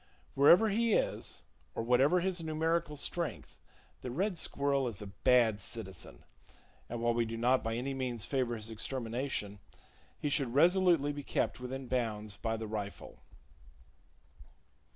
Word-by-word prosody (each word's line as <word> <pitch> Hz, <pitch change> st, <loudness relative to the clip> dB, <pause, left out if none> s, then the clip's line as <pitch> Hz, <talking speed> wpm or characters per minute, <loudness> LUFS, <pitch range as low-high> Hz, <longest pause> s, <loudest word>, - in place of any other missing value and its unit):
Wherever 175 Hz, +10 st, +6 dB
he 225 Hz, +2 st, +2 dB
is -, -, -1 dB, 0.3 s
or -, -, -2 dB
whatever 135 Hz, +9 st, +4 dB
his 185 Hz, 0 st, 0 dB
[Page 165 Hz, -, -6 dB
80] -, -, -4 dB
numerical 160 Hz, -1 st, 0 dB
strength, 145 Hz, -, -4 dB, 0.4 s
the 125 Hz, -, -5 dB
red 185 Hz, -, -1 dB
squirrel 140 Hz, -2 st, 0 dB
is 110 Hz, -5 st, -4 dB
a 105 Hz, -, -6 dB
bad 110 Hz, +1 st, +3 dB
citizen, 95 Hz, -, -9 dB, 0.7 s
and, 120 Hz, 0 st, -4 dB
while 120 Hz, 0 st, +3 dB
we 120 Hz, 0 st, +2 dB
do 115 Hz, 0 st, -4 dB
not 125 Hz, +3 st, +3 dB
by 115 Hz, 0 st, -1 dB
any 130 Hz, +3 st, -2 dB
means 125 Hz, -5 st, -3 dB
favor 130 Hz, -4 st, 0 dB
his 110 Hz, 0 st, -4 dB
extermination, 115 Hz, -2 st, -3 dB, 0.6 s
he -, -, -2 dB
should 135 Hz, -4 st, 0 dB
resolutely 170 Hz, -2 st, +4 dB
be 145 Hz, -, -5 dB
kept -, -, -1 dB
within 130 Hz, +1 st, -5 dB
bounds 110 Hz, -4 st, -1 dB
by 115 Hz, +1 st, -2 dB
the 110 Hz, -, -5 dB
rifle. 105 Hz, -2 st, -6 dB
125 Hz, 150 wpm, -32 LUFS, 115-145 Hz, 0.7 s, Wherever